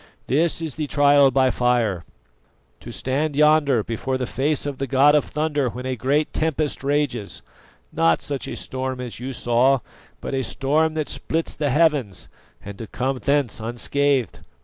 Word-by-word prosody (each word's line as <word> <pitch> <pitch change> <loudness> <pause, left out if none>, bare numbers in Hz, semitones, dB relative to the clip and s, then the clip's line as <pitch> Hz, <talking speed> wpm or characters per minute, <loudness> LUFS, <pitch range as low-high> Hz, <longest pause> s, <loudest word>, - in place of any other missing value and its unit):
This 165 +4 +1
is 160 -4 -3
the 150 +1 -4
trial 145 -1 +5
by 130 0 +3
fire: 120 -8 +1 0.8
to - - -9
stand 140 +3 -2
yonder 150 -5 +4
before 130 +4 -3
the 130 - -2
face 140 +4 -1
of 145 -2 -4
the 135 - -2
god 135 +3 +5
of 150 - +4
thunder 150 -3 -1
when 125 +2 -7
a 130 0 -2
great 140 +6 0
tempest 155 -3 -1
rages 140 -7 -1 0.5
not 80 -1 +2
such 140 -2 -4
a - - -5
storm 130 0 -4
as 125 -3 -6
you 130 +2 -5
saw, 125 +2 +2 0.4
but - - -6
a 135 - 0
storm 155 +6 0
that 155 -2 -1
splits 165 +1 -2
the 145 -2 -1
heavens 145 - +1 0.4
and 100 0 -8
to 115 - -6
come 130 +3 -2
thence 140 -4 0
unscathed. 130 +3 0
135 Hz, 170 wpm, -22 LUFS, 125-150 Hz, 0.8 s, trial